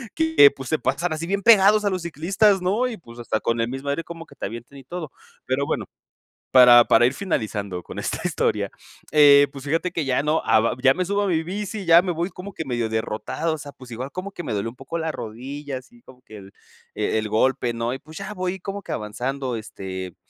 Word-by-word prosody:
que 320 - +6
pues 135 -2 -9
se 155 - +1
pasan 160 +6 -1
así 160 +2 -4
bien 200 +2 -1
pegados 210 -1 +6
a - - +3
los 185 -2 -2
ciclistas, 190 +5 +2
¿no? 210 +8 +1
Y 230 - -6
pues, 120 - -14
hasta 115 -2 -2
con 115 +1 -1
el 115 - -1
mismo 135 +2 -6
aire 140 +4 -1
como 165 -1 -9
que - - -18
te - - -5
avienten 120 +6 -10
y - - -14
todo. 160 +1 -7 0.3
Pero 130 +2 0
bueno, - - -2 0.7
para 125 -2 +8
para 120 - +5
ir 125 - +2
finalizando 105 - -3
con - - -8
esta - - -3
historia, - - 0 0.4
eh, 145 -1 +7
pues 135 -1 -10
fíjate 165 +5 -1
que 165 -3 -2
ya 135 +1 +1
no, 150 +2 +1
a - - +5
va 115 - 0
ya 135 0 +5
me 185 - -1
subo 200 +2 0
a - - 0
mi 165 -3 +1
bici, 205 +3 -5
ya 170 0 +7
me 180 0 -2
voy 170 +3 -2
como 195 +1 -9
que 160 - -4
medio 120 -3 -1
derrotado, 110 +8 -2
o - - -8
sea, 145 -1 -9
pues, 130 -2 -14
igual 130 +4 -6
como 190 +2 -6
que 175 - -7
me 125 - -3
dolió 105 +2 -2
un 115 - -14
poco 135 +5 -5
la 160 -1 -2
rodilla, 135 +4 -6
así 235 - -15
como 125 -1 -17
que 110 -4 -13
el 95 -1 -13 0.4
e - - 0
el 110 0 -1
golpe, 120 +2 +1
¿no? 115 +1 -2
Y 135 - -6
pues, 155 +1 -13
ya 200 +1 -6
voy 185 -1 -3
como 200 +2 -6
que - - -9
avanzando, 125 +4 -3
este, 95 -4 -7
145 Hz, 240 wpm, -23 LUFS, 120-180 Hz, 0.7 s, para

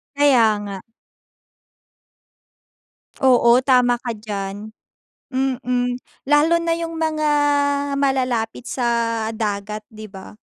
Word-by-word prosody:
Kaya 280 -5 +5 0.2
nga. 200 -1 -6 2.5
Oo, 250 -1 +5
tama 250 -2 +3
ka 245 - -4
diyan. 210 -1 -6 0.6
Mm, 250 -2 -1 0.3
lalo 295 +3 +4
na 335 0 0
yung 330 0 -4
mga 315 -1 -1 0.7
malalapit 255 -5 -1
sa 230 -2 -1
dagat, 210 -1 -3
'di 215 -1 -10
ba. 195 +1 -12
245 Hz, 90 wpm, -20 LUFS, 215-270 Hz, 2.5 s, Kaya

